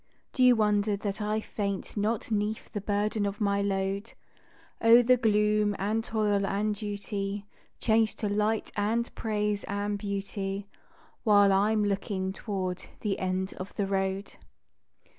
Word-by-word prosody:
Do 260 - -1
you 250 -1 +7
wonder 210 -1 +2
that 205 +1 -4
I 210 +1 0
faint 200 -3 -4
not 215 +2 -1
'neath 210 +1 -1
the 205 - -3
burden 205 +1 0
of 200 +1 -4
my 200 -1 +1
load? 195 +2 -1 0.7
O, 230 +2 +7
the 255 +2 +5
gloom 210 -2 +2
and 215 +4 0
toil 210 -3 +1
and 205 +2 0
duty 205 -1 -4 0.3
Change 220 -1 +2
to 210 - -2
light 210 +2 0
and 220 +3 0
praise 210 -2 -1
and 205 0 -2
beauty 200 0 -3 0.6
While 205 -3 +6
I'm 210 +2 +3
looking 195 -1 -1
toward 185 -3 -3 0.2
the 205 -3 -1
end 185 0 -1
of 185 +2 -7
the 200 - 0
road. 195 0 -2
205 Hz, 140 wpm, -28 LUFS, 200-215 Hz, 0.7 s, you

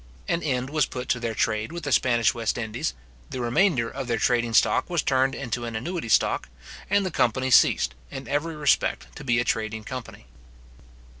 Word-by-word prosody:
An 170 - 0
end 130 -3 -2
was 150 -2 +2
put 125 0 -6
to 120 - +1
their 115 -2 -3
trade 110 +4 0
with 170 0 -6
the 145 - -3
Spanish 120 -2 +3
West 115 -2 -2
Indies; 110 - -3 0.3
the - - -5
remainder 125 +1 +2
of 135 +1 -6
their 120 -1 0
trading 120 0 +1
stock - - +3
was 170 -3 0
turned 135 0 +2
into 120 -2 -4
an 115 -1 -5
annuity 160 +3 -4
stock; - - +2 0.4
and 200 -1 +2
the 185 - -2
company 130 -1 +1
ceased, 115 - +5 0.2
in 135 -1 -7
every 150 +3 -1
respect, 150 -2 0
to - - -9
be 120 -3 +1
a - - +2
trading 110 -1 -2
company. 130 - -8
125 Hz, 195 wpm, -25 LUFS, 115-145 Hz, 0.4 s, ceased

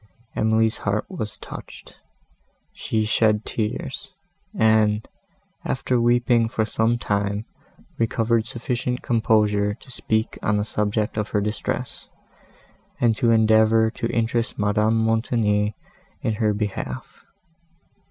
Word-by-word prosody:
Emily's 110 +1 +2
heart 100 +1 -1
was 110 - -4
touched; - - -11 0.7
she 110 -1 -1
shed 110 0 +2
tears, 110 -2 -4 0.4
and, 110 -1 +3 0.6
after 125 -2 0
weeping 120 -1 +3
for 110 -1 0
some 110 +2 +1
time, 100 -1 -1 0.5
recovered 115 0 +1
sufficient 125 +1 -3
composure 105 -4 +2
to 130 - -14
speak 110 -2 -1
on 105 - +1
the 105 - 0
subject 105 0 -1
of 105 -1 -1
her 105 - +1
distress, 105 +1 -3 0.9
and 115 -2 +3
to 120 -4 +2
endeavour 110 0 +4
to 115 - -3
interest 115 +1 -1
Madame 105 +2 +2
Montoni 110 -2 +1 0.5
in 110 - +1
her 110 0 +1
behalf. 100 - -5
110 Hz, 115 wpm, -23 LUFS, 105-115 Hz, 0.9 s, endeavour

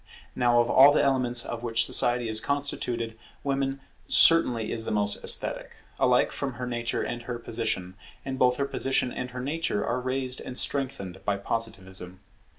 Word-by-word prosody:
Now 120 -1 +3
of 120 - +2
all 135 +3 +7
the - - +2
elements 125 -3 +2
of 115 - -5
which 115 -1 +1
society 120 0 +1
is 110 -1 +1
constituted, 120 -5 -3 0.3
Woman 135 -1 -2 0.3
certainly 125 -10 +4
is 115 - 0
the - - -3
most 105 -1 +1
esthetic, - - +2 0.2
alike - - +3
from 140 -2 -4
her 125 +1 -6
nature 120 -1 -2
and 120 0 -4
her 120 0 -5
position; 110 -6 -3 0.3
and 135 -1 -4
both 125 0 +4
her 140 - -1
position 135 -2 0
and 125 - -5
her 125 0 -7
nature 145 -5 -2
are 125 +2 -2
raised 130 0 -3
and 125 - -7
strengthened 100 -10 -2
by 100 -1 0
Positivism. 95 -4 -4
120 Hz, 170 wpm, -26 LUFS, 115-135 Hz, 0.3 s, all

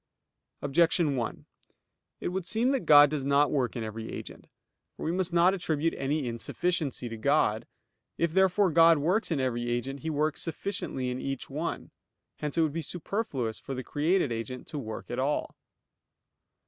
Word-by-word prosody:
Objection 155 +1 +2
1: 120 -3 -4 0.8
It - - -1
would 180 -1 -3
seem 235 +5 +2
that 270 -3 -1
God 145 -1 +8
does 150 -3 -2
not 140 +1 +3
work 130 -6 0
in 120 - -3
every 110 +1 -6
agent. - - -8 0.5
For - - -7
we 160 - 0
must 185 0 0
not 175 +2 +4
attribute 165 -4 0
any 140 0 -1
insufficiency 140 +4 -2
to 115 -1 -6
God. 115 -3 +1 0.5
If 170 -1 0
therefore 190 0 +3
God 165 0 +6
works 180 +10 +1
in 160 -5 0
every 120 -2 -1
agent, 130 +3 -2
He 160 - -4
works 155 0 0
sufficiently 165 -6 -3
in 125 - -4
each 135 -1 -4
one. 155 +4 -4 0.5
Hence 150 +1 -4
it - - +5
would 155 -2 0
be 165 - -2
superfluous 150 - -3
for 135 - -6
the 130 - -4
created 155 +1 +1
agent 115 +2 -5
to 150 - -4
work 110 -4 -7
at 120 - -2
all. 140 +3 -1
150 Hz, 175 wpm, -29 LUFS, 130-170 Hz, 0.8 s, God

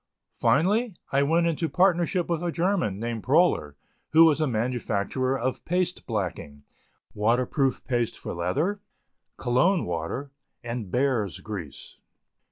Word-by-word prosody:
Finally, 205 - +2 0.2
I 140 - +3
went 165 +4 +2
into 165 -1 0
partnership 180 -1 +2
with 170 -2 -1
a 175 -1 -1
German, 170 - 0
named 115 0 -3
Proler, 130 - +2 0.4
who 165 +1 +8
was 155 -1 +3
a 155 - +2
manufacturer 125 +2 -1
of 130 +2 -2
paste 180 +1 -1
blacking, 85 - -4 0.5
water 115 +4 +2
proof 135 -1 -1
paste 120 -3 -1
for - - -6
leather, 145 - -1 0.6
Cologne 155 +10 +2
water 90 - -4 0.3
and 115 -4 -5
bear's 120 -5 0
grease. 90 -10 -8
130 Hz, 130 wpm, -26 LUFS, 110-170 Hz, 0.6 s, who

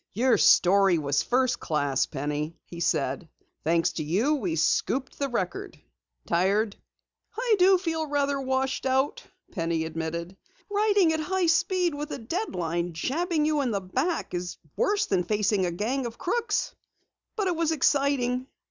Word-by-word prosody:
"Your 245 +2 +3
story 190 -1 +5
was 140 -2 +1
first 250 0 +1
class, 145 -4 0
Penny," 150 +3 -4
he 170 - -10
said. 145 -1 -1 0.3
"Thanks 165 +1 +2
to 155 - -3
you 200 - +1
we 320 +3 -1
scooped 270 -3 0
the 280 -1 -1
Record. 190 -7 -4 0.5
Tired?" 200 +4 +1 0.6
"I 475 -2 +2
do 375 +1 +6
feel 325 -3 -2
rather 285 -1 0
washed 265 0 -1
out," 265 +2 +1 0.3
Penny 165 -3 -1
admitted. 165 +2 -4 0.4
"Writing 405 -5 +3
at 315 - -1
high 370 +3 0
speed 345 +1 +2
with 295 +1 -5
a - - -3
deadline 175 - -3
jabbing 310 - 0
you 305 -1 +1
in 260 - 0
the 205 -3 0
back 250 - -2
is 180 0 -4 0.2
worse 410 0 +1
than 185 -2 +1
facing 205 -1 +1
a - - -2
gang 240 +9 -2
of 230 - -9
crooks. 465 +6 -1 0.6
But 415 - -1
it 360 -2 0
was 325 -1 +1
exciting." 270 -4 +1
250 Hz, 155 wpm, -26 LUFS, -, 0.6 s, do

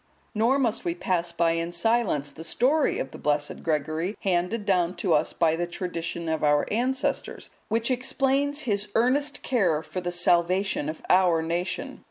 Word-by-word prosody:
Nor 230 +5 +2
must 245 -6 0
we 170 -1 -1
pass 175 -1 -1
by 170 0 +2
in 165 +1 -2
silence 175 -6 0
the 160 +3 -10
story 265 - +1
of 135 - -4
the - - -10
blessed 145 0 -1
Gregory, 160 +5 -1
handed 190 +3 0
down 180 -2 +1
to 175 0 0
us 150 0 +2
by 165 -2 +2
the 175 +1 -2
tradition 170 -1 -4
of 160 -1 -1
our 145 0 +3
ancestors, 255 +4 -2 0.2
which 230 +3 0
explains 270 +3 0
his 210 -5 -1
earnest 260 +6 +1
care 180 - +1
for 185 - -5
the 175 0 -3
salvation 175 -1 +2
of 155 - -7
our 180 -3 +4
nation. 170 +2 -3
180 Hz, 170 wpm, -26 LUFS, 165-230 Hz, 0.2 s, our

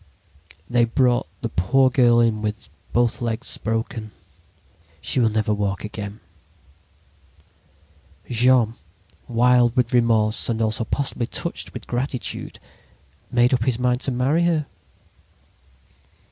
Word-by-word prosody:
"They 120 +1 +3
brought 120 +1 +1
the - - -2
poor 130 +9 +2
girl 120 -2 +4
in 110 -2 +1
with 105 0 -4 0.2
both 120 0 +1
legs 115 +1 -3
broken. 115 0 -3 0.9
She 130 - -1
will 115 -2 +3
never 110 -1 0
walk 100 -2 -2
again. 105 0 -7 2.1
"Jean, 120 -1 +3 0.5
wild 120 0 +3
with 125 -1 +1
remorse 115 -3 +2
and 115 -1 -1
also 110 0 0
possibly 130 -3 -2
touched - - -4
with - - -7
gratitude, 125 +1 -4 0.7
made 120 +1 +3
up 125 - +1
his 130 -3 +1
mind 125 0 0
to 135 - -1
marry 135 +7 +1
her. 160 -3 +1
120 Hz, 120 wpm, -22 LUFS, 110-125 Hz, 2.1 s, girl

